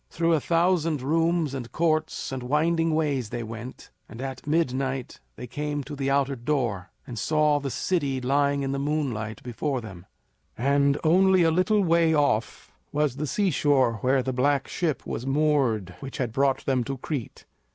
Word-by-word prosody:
Through 165 Hz, 0 st, +1 dB
a 160 Hz, -, +3 dB
thousand 165 Hz, -3 st, +1 dB
rooms 165 Hz, 0 st, +1 dB
and 125 Hz, -4 st, -6 dB
courts 155 Hz, -3 st, 0 dB
and 130 Hz, -1 st, -4 dB
winding 160 Hz, +5 st, +1 dB
ways 140 Hz, -8 st, 0 dB
they 120 Hz, +1 st, -4 dB
went, 115 Hz, +3 st, -9 dB, 0.2 s
and 115 Hz, -, -10 dB
at 135 Hz, +1 st, -6 dB
midnight 135 Hz, -4 st, -1 dB, 0.2 s
they -, -, -7 dB
came 145 Hz, +3 st, -3 dB
to 145 Hz, +2 st, -7 dB
the 135 Hz, -1 st, -2 dB
outer 140 Hz, 0 st, +1 dB
door 120 Hz, -8 st, -2 dB, 0.2 s
and 120 Hz, -3 st, -6 dB
saw 150 Hz, -1 st, +2 dB
the 140 Hz, -1 st, -4 dB
city 140 Hz, -3 st, -1 dB
lying 140 Hz, +2 st, +1 dB
in 135 Hz, -, -1 dB
the 140 Hz, -, -2 dB
moonlight 135 Hz, -8 st, -2 dB
before 130 Hz, +3 st, -2 dB
them; 95 Hz, -5 st, -10 dB, 0.5 s
and, 140 Hz, +3 st, +2 dB
only 185 Hz, +2 st, +5 dB
a 165 Hz, -, +4 dB
little 195 Hz, +5 st, +2 dB
way 165 Hz, -2 st, +3 dB
off, 120 Hz, -7 st, 0 dB, 0.2 s
was 150 Hz, -3 st, 0 dB
the 150 Hz, +1 st, -2 dB
seashore 140 Hz, -, +2 dB
where 130 Hz, 0 st, +2 dB
the 130 Hz, -, -2 dB
black 140 Hz, +2 st, +1 dB
ship 155 Hz, -7 st, -2 dB
was 125 Hz, -, -4 dB
moored 135 Hz, -10 st, +1 dB
which 135 Hz, -, -7 dB
had 120 Hz, -4 st, -2 dB
brought 135 Hz, +1 st, +1 dB
them 130 Hz, -2 st, +1 dB
to 135 Hz, -1 st, -4 dB
Crete. 130 Hz, -2 st, -5 dB
140 Hz, 170 wpm, -26 LUFS, 130-155 Hz, 0.5 s, only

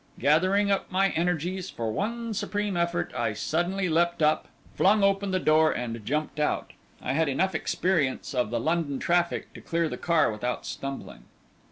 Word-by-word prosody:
Gathering 185 Hz, +7 st, +3 dB
up 195 Hz, -, -1 dB
my 195 Hz, +1 st, +3 dB
energies 180 Hz, +2 st, -1 dB
for 115 Hz, -2 st, -3 dB
one 230 Hz, -, -2 dB
supreme 205 Hz, -1 st, -2 dB
effort, 170 Hz, 0 st, -1 dB
I 115 Hz, -2 st, 0 dB
suddenly 175 Hz, -, -1 dB
leapt 170 Hz, 0 st, +1 dB
up, 155 Hz, +1 st, +2 dB, 0.3 s
flung 200 Hz, +2 st, +4 dB
open 195 Hz, 0 st, +2 dB
the 185 Hz, -, +1 dB
door, 155 Hz, -2 st, +4 dB
and 115 Hz, -2 st, -4 dB
jumped 150 Hz, +5 st, -2 dB
out. 150 Hz, -, -1 dB, 0.3 s
I 130 Hz, -, -1 dB
had 160 Hz, +1 st, +2 dB
enough 190 Hz, +8 st, +1 dB
experience 155 Hz, -5 st, 0 dB
of 125 Hz, -4 st, 0 dB
the 120 Hz, +1 st, -1 dB
London 155 Hz, 0 st, 0 dB
traffic 175 Hz, +3 st, 0 dB
to -, -, -11 dB
clear 170 Hz, 0 st, 0 dB
the -, -, -5 dB
car 165 Hz, -7 st, +2 dB
without 120 Hz, +4 st, -3 dB
stumbling. 135 Hz, -, -6 dB
170 Hz, 170 wpm, -27 LUFS, 140-190 Hz, 0.3 s, flung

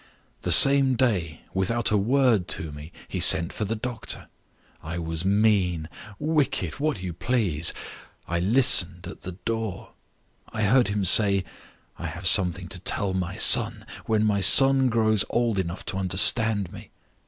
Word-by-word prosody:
The -, -, -3 dB
same 135 Hz, -1 st, +6 dB
day 95 Hz, -, -2 dB
(without 110 Hz, +4 st, -1 dB
a -, -, +1 dB
word 115 Hz, -2 st, 0 dB
to 80 Hz, -2 st, -8 dB
me) 75 Hz, +3 st, -12 dB, 0.2 s
he -, -, -6 dB
sent 85 Hz, +2 st, +5 dB
for 105 Hz, -, -5 dB
the 110 Hz, +3 st, -4 dB
doctor. 115 Hz, 0 st, -7 dB, 0.5 s
I 80 Hz, +2 st, -7 dB
was 80 Hz, 0 st, -5 dB
mean, 95 Hz, -5 st, 0 dB, 0.3 s
wicked, 145 Hz, -, -3 dB
what 145 Hz, -10 st, -3 dB
you 90 Hz, -2 st, -6 dB
please 100 Hz, -6 st, -1 dB, 0.6 s
I 85 Hz, 0 st, -3 dB
listened 95 Hz, -4 st, +2 dB
at -, -, -11 dB
the 95 Hz, -, -8 dB
door. 110 Hz, +2 st, -6 dB, 0.6 s
I 110 Hz, -2 st, -4 dB
heard 120 Hz, +3 st, +2 dB
him 100 Hz, -1 st, -3 dB
say: 100 Hz, 0 st, +3 dB, 0.5 s
_I 85 Hz, -, -6 dB
have 85 Hz, +3 st, -9 dB
something 90 Hz, -1 st, +3 dB
to -, -, -9 dB
tell 100 Hz, -2 st, -2 dB
my 90 Hz, -1 st, -5 dB
son, -, -, +3 dB, 0.2 s
when 110 Hz, -1 st, 0 dB
my 100 Hz, -2 st, -1 dB
son 135 Hz, +5 st, +4 dB
grows 110 Hz, -3 st, 0 dB
old 115 Hz, -4 st, -2 dB
enough 90 Hz, 0 st, -6 dB
to 95 Hz, -, -3 dB
understand 100 Hz, +2 st, +1 dB
me. -, -, -13 dB
100 Hz, 155 wpm, -23 LUFS, 90-115 Hz, 0.6 s, same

